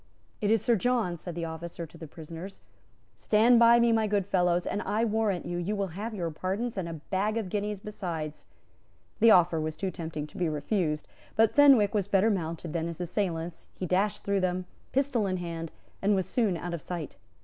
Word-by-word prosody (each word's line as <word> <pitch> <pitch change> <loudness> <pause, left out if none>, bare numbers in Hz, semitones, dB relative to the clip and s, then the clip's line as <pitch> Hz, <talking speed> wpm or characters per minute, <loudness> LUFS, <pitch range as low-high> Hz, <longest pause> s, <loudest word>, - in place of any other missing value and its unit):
"It 205 - +1
is 220 -1 +3
Sir 235 +1 +4
John," 225 -4 +1
said 170 0 -7
the 170 -1 -3
officer 165 +1 -6
to 160 - -17
the 165 -1 -9
prisoners: 165 +5 -9 0.5
"Stand 230 +3 +4
by 235 0 +7
me, 235 0 +4
my 220 -1 +2
good 205 -2 +1
fellows, 180 -2 +2
and, 205 - -2
I 220 +2 0
warrant 215 -4 0
you, 175 0 -3
you 195 +5 -1
will 200 -2 -1
have 210 +6 -5
your 170 -4 -2
pardons, 195 +9 -3
and 185 -4 -3
a - - -5
bag 195 +7 -2
of 215 -5 -2
guineas 205 +1 -2
besides." 170 -7 -5 0.7
The 230 +1 +7
offer 175 -5 +5
was 155 0 -3
too 190 -2 -3
tempting 160 -3 -5
to 150 - -13
be 175 -3 +1
refused; 150 +1 -1 0.3
but 225 0 +4
Fenwick 275 -8 +6
was 205 -3 0
better 205 +2 +3
mounted 165 -3 -3
than 165 -1 -1
his 170 -1 -6
assailants; 175 -2 -3
he 185 - -4
dashed 190 +4 0
through 200 0 +1
them, 185 0 -1 0.3
pistol 260 -6 +1
in 185 -1 -1
hand, 165 -2 -5 0.3
and 205 +1 +3
was 190 -2 0
soon 215 -8 +1
out 175 +1 -5
of 170 - -4
sight. 170 -2 -5
185 Hz, 205 wpm, -28 LUFS, 170-210 Hz, 0.7 s, by